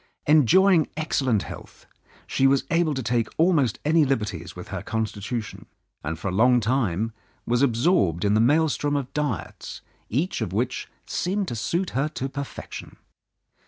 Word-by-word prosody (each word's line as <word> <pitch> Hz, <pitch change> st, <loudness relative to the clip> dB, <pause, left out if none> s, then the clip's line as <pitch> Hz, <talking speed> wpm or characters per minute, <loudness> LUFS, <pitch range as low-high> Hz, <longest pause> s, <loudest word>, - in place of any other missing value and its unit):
Enjoying 160 Hz, -, +5 dB
excellent 130 Hz, -, +1 dB
health, -, -, -11 dB, 0.4 s
she 135 Hz, -, +2 dB
was 135 Hz, 0 st, +3 dB
able 165 Hz, -3 st, +2 dB
to 130 Hz, -, -3 dB
take 115 Hz, 0 st, +1 dB
almost 160 Hz, -7 st, +3 dB
any 160 Hz, +1 st, +4 dB
liberties 105 Hz, -, -2 dB
with -, -, -9 dB
her -, -, -4 dB
constitution, 110 Hz, 0 st, -4 dB, 0.4 s
and 80 Hz, +2 st, -3 dB
for 95 Hz, -, -3 dB
a -, -, -4 dB
long 125 Hz, +5 st, +5 dB
time 115 Hz, -3 st, 0 dB, 0.3 s
was 120 Hz, +1 st, +1 dB
absorbed 115 Hz, -, +2 dB
in 100 Hz, -, +3 dB
the 110 Hz, -, +4 dB
maelstrom 145 Hz, +2 st, +2 dB
of 140 Hz, -3 st, -3 dB
diets, 125 Hz, -, -4 dB, 0.3 s
each 150 Hz, -, -1 dB
of 90 Hz, -, -3 dB
which 120 Hz, +5 st, -2 dB, 0.2 s
seemed 195 Hz, +2 st, -1 dB
to -, -, -4 dB
suit 170 Hz, -, -1 dB
her 135 Hz, +4 st, 0 dB
to 135 Hz, -3 st, -4 dB
perfection. 140 Hz, 0 st, -7 dB
130 Hz, 155 wpm, -25 LUFS, 110-155 Hz, 0.4 s, Enjoying